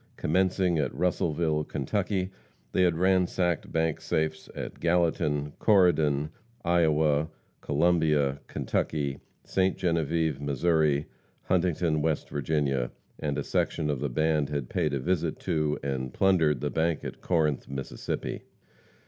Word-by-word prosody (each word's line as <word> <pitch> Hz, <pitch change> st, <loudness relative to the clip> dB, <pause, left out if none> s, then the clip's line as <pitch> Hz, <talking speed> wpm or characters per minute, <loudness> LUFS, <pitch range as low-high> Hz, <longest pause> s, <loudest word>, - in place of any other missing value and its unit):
Commencing 90 Hz, 0 st, +1 dB
at 75 Hz, -, 0 dB
Russellville, 80 Hz, -3 st, 0 dB
Kentucky, 95 Hz, +7 st, -2 dB, 0.4 s
they -, -, +2 dB
had 85 Hz, -3 st, +3 dB
ransacked 90 Hz, -1 st, +1 dB
bank 80 Hz, -1 st, 0 dB
safes 80 Hz, 0 st, -2 dB
at -, -, -6 dB
Gallatin, 80 Hz, -4 st, +1 dB
Corydon, 80 Hz, -8 st, +3 dB, 0.3 s
Iowa, 80 Hz, -3 st, +3 dB, 0.3 s
Columbia, 75 Hz, -3 st, +2 dB
Kentucky, 70 Hz, -3 st, -2 dB, 0.2 s
Ste. 95 Hz, 0 st, +1 dB
Genevieve, 80 Hz, -4 st, 0 dB
Mo., 75 Hz, +1 st, +2 dB, 0.4 s
Huntington, 85 Hz, -3 st, +1 dB
West 80 Hz, 0 st, -1 dB
Virginia, 70 Hz, -3 st, 0 dB, 0.3 s
and 70 Hz, -2 st, -2 dB
a -, -, -1 dB
section 75 Hz, -3 st, 0 dB
of 70 Hz, -, -2 dB
the 70 Hz, +1 st, -1 dB
band 75 Hz, +2 st, +1 dB
had 70 Hz, -4 st, -3 dB
paid 75 Hz, -2 st, 0 dB
a -, -, -1 dB
visit 85 Hz, +1 st, -1 dB
to, 75 Hz, -4 st, 0 dB
and 65 Hz, -2 st, -2 dB
plundered 80 Hz, -8 st, +2 dB
the -, -, -1 dB
bank 80 Hz, -1 st, 0 dB
at -, -, -7 dB
Corinth, 80 Hz, -5 st, 0 dB
Mississippi. 65 Hz, -3 st, -4 dB
80 Hz, 125 wpm, -28 LUFS, 75-85 Hz, 0.4 s, had